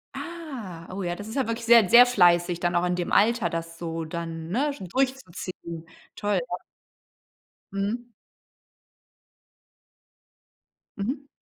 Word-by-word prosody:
Ah, 255 - -7
oh 195 0 -4
ja, 175 0 -2
das 205 +3 -8
ist 220 - -7
ja 270 - +1
wirklich 230 0 -3
sehr, 230 -4 +7
sehr 245 +1 +9
fleißig 175 -6 +4
dann 175 0 0
auch 175 +1 +2
in 180 - +1
dem 175 -1 -3
Alter, 230 0 +3
das 165 0 -5
so 165 -1 -4
dann, 165 0 -5
ne, 280 +8 0
schon 190 -8 -8
durchzuziehen, 185 -9 -3 0.3
toll, 205 -1 0
ja. 180 - -2 1.2
Mhm. 210 +5 -2 2.9
Mhm. 260 +8 -3
195 Hz, 130 wpm, -26 LUFS, 175-235 Hz, 2.9 s, sehr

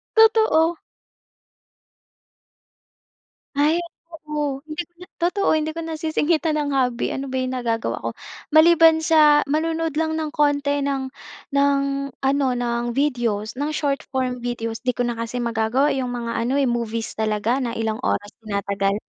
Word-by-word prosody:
Totoo. 440 -7 +5 2.8
Ay, 300 +4 +3 0.3
totoo. 300 -3 -3 0.2
Hindi 310 +3 -4
ko 345 - -26
na 360 - -11
totoo, 360 +4 0
hindi 310 0 -1
ko 330 - -7
nasisingitan 320 -1 0
ng 290 -1 -1
hobby 250 -2 +1
ano 270 -1 -5
ba 260 - -1
'yong 255 0 -2
nagagawa 230 -2 -2
ko. - - -1 0.4
Maliban 325 +1 +6
sa 305 -2 +5
manonood 320 +1 -1
lang 315 0 0
ng 315 - -2
konti 285 -1 +1
ng 275 -1 -1 0.5
ng 280 0 +3 0.4
ano, 275 +1 +1
ng 240 -1 -1
videos 235 -5 -1
ng 290 +3 -2
short 285 -2 -1
form 255 -2 -2
videos 230 -1 -4
'di 250 - +2
ko 245 0 -1
na 240 - -2
kasi 230 +2 -4
magagawa 235 +3 +1
'yong 255 -2 -2
mga 235 -1 -4
ano, 250 +5 0
eh, 275 - +2
movies 230 -2 -2
talaga 220 +4 0
na 240 - -2
ilang 220 -1 -1
oras 205 - 0 0.2
tinatagal. 200 -1 -1
275 Hz, 145 wpm, -22 LUFS, 235-310 Hz, 2.8 s, Maliban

